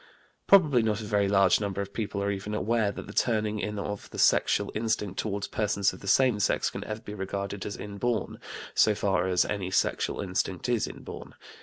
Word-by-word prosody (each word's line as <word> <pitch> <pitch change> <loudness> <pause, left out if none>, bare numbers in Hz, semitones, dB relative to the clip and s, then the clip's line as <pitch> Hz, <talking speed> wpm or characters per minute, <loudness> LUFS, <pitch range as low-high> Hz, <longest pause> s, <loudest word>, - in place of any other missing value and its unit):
Probably 155 -11 +6
not 110 -1 0
a - - -6
very 105 -1 +1
large 100 -2 +4
number 100 -1 -2
of 100 0 -4
people 100 -3 -3
are 100 - 0
even 100 +2 -4
aware 110 -1 +1
that - - -8
the 100 - -10
turning 110 -3 +1
in 105 +1 -3
of 100 0 -5
the - - -10
sexual 100 - +3
instinct 110 -3 -1
toward 100 -2 -2
persons 105 -2 +1
of - - -11
the 100 - -10
same 125 +1 +4
sex 100 - +1
can - - -6
ever 110 +1 -5
be 105 -2 -8
regarded 100 0 -4
as 100 - -5
inborn, 105 +4 -3 0.3
so 110 - +4
far 95 -2 +1
as 90 -1 +3
any 100 -3 -3
sexual 95 - 0
instinct 95 0 -2
is 120 -3 +1
inborn. - - -9
105 Hz, 200 wpm, -28 LUFS, 100-110 Hz, 0.3 s, Probably